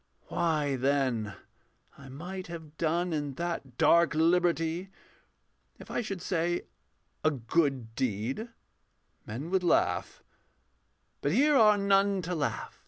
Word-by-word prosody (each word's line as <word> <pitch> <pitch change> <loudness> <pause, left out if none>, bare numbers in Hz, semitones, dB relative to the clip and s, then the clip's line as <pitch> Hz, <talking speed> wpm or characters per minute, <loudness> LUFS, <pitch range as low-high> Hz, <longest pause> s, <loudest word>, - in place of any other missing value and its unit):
Why, 150 -5 0
then, 130 -6 0 0.6
I 135 -1 -13
might 180 +7 -7
have 160 -3 -9
done 170 +2 0
in 145 -3 -3
that 165 -7 -4
dark 170 -1 +4
liberty 170 +1 +2 0.9
If - - -11
I - - 0
should 195 -6 -5
say 175 -1 0 0.6
'a 155 - +5
good 135 -3 0
deed,' 125 - -2 0.8
men 135 +11 -5
would 190 -1 +2
laugh, 175 - +1 1.0
But 145 - 0
here 290 +7 +4
are 215 -4 +6
none 200 -1 +2
to 175 +2 -3
laugh. 155 -4 -3
165 Hz, 120 wpm, -29 LUFS, 140-180 Hz, 1.0 s, are